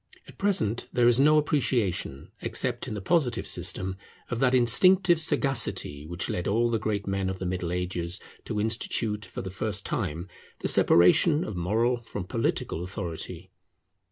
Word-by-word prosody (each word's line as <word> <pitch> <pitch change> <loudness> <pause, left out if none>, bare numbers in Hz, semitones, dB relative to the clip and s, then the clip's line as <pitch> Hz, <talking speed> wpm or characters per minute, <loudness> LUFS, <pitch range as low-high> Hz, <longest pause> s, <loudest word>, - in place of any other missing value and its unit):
At - - -15
present 180 - 0
there 120 -1 +3
is 120 +1 +4
no 150 +2 +5
appreciation, 120 - 0
except - - -2
in - - -4
the 100 - -6
Positive 140 - +1
system, 95 0 -1 0.3
of 120 - -2
that 130 0 +3
instinctive 175 +8 +5
sagacity 130 - 0
which 85 +1 -3
led 90 - -3
all 115 +4 +2
the 115 - 0
great 105 -1 -2
men 95 -1 -2
of 95 - -4
the 95 - -5
Middle 90 -1 -3
Ages 90 0 -3 0.3
to 110 -3 -3
institute, 110 -1 -1
for - - -7
the 95 - -6
first 100 +1 -3
time, 85 -4 -3 0.3
the - - -1
separation 150 - +4
of 105 - -6
moral 115 +8 0
from 105 -4 -6
political 115 -5 -2
authority. 85 -3 -6
105 Hz, 160 wpm, -27 LUFS, 90-125 Hz, 0.3 s, no